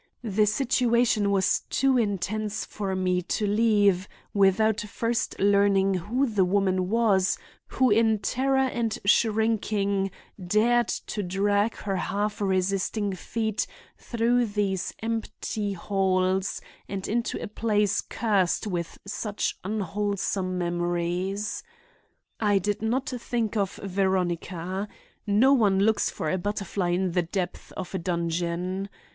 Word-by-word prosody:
The 210 -1 +2
situation 235 -2 +2
was 190 -2 +2
too 270 -1 +2
intense 215 -1 -1
for 195 -2 -3
me 180 -1 +1
to 195 +4 -2
leave 205 -3 +3 0.3
without 205 +2 +3
first 230 +3 -2
learning 200 -1 +4
who 220 +10 0
the 210 -6 +2
woman 185 -1 +1
was 210 -4 +2 0.3
who 260 -3 +2
in 220 0 +4
terror 265 +6 0
and 240 -4 0
shrinking 210 -2 +2 0.3
dared 230 +6 +3
to 210 - -3
drag 205 +3 +1
her 195 -2 -3
half 205 +3 -2
resisting 195 +1 0
feet 220 +3 -2 0.3
through 235 +1 +1
these 200 -3 -1
empty 220 -2 -3
halls 190 0 0 0.3
and 195 -1 -4
into 230 +2 -1
a - - -5
place 210 -1 +1
cursed 205 -4 0
with 175 -5 -3
such 205 +1 -2
unwholesome 200 -1 -2
memories. 175 +3 -1 0.8
I 205 -2 +3
did 205 +2 -1
not 250 +5 0
think 240 -4 -2
of 200 -3 0
Veronica. 185 -1 -1 0.4
No 225 +7 +5
one 210 -7 +3
looks 215 +2 +2
for 155 - -3
a 185 - 0
butterfly 195 -1 -2
in 180 +1 +1
the 180 +1 +2
depths 175 +1 -4
of 185 - -6
a 190 - -1
dungeon. 175 +2 -2
200 Hz, 120 wpm, -26 LUFS, 185-220 Hz, 0.8 s, No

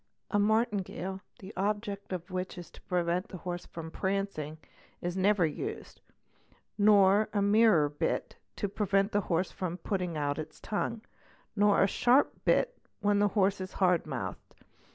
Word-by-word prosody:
A 205 - +2
martingale, 205 -3 0 0.2
the 195 +2 -10
object 205 0 -2
of 180 0 -5
which 185 0 -4
is 175 - -9
to - - -15
prevent 180 +2 -1
the 190 - -8
orse 175 -1 -4
from 160 -1 -8
prancing, 190 -6 -2 0.4
is 175 0 -3
never 190 -1 +3
used, 155 - -5 0.7
nor 205 0 +5
a 205 - +1
mirror 205 -7 +5
bit 145 0 -2 0.2
to 205 - -2
prevent 200 0 +1
the 205 - +2
orse 175 +2 0 0.3
putting 180 -5 -2
out 145 0 -1
its 155 0 -7
tongue, 220 +1 -3 0.5
nor 205 -1 +4
a - - +4
sharp 250 +7 +3
bit - - +2 0.2
when 205 0 +3
the 205 - +4
horse 195 0 +3
is 185 - -6
hard 180 -3 +2
houthed. - - -4
195 Hz, 155 wpm, -30 LUFS, 175-205 Hz, 0.7 s, nor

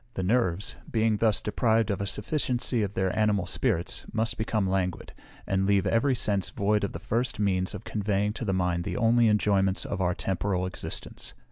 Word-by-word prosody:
The 95 - -2
nerves, 95 -3 0
being 110 -1 +2
thus 110 -1 +3
deprived 110 0 +1
of 100 - -2
a 100 - -2
sufficiency 125 +1 0
of 100 -1 -2
their 95 0 0
animal 105 -3 +2
spirits, 90 -2 -1
must 110 0 0
become 110 -2 -1
languid, 95 -2 -2 0.3
and 95 0 0
leave 100 -2 +3
every 130 +4 +2
sense 100 -5 0
void 105 +1 0
of 100 - -2
the - - -4
first 115 +6 -2
means 95 -3 0
of 100 - -8
conveying 105 -1 -1
to 120 - -6
the 100 - 0
mind 90 -2 0
the - - -3
only 115 +1 +4
enjoyments 100 -3 +2
of 100 - -3
our 90 0 +1
temporal 95 -1 -1
existence. 95 - -6
100 Hz, 190 wpm, -27 LUFS, 95-110 Hz, 0.3 s, only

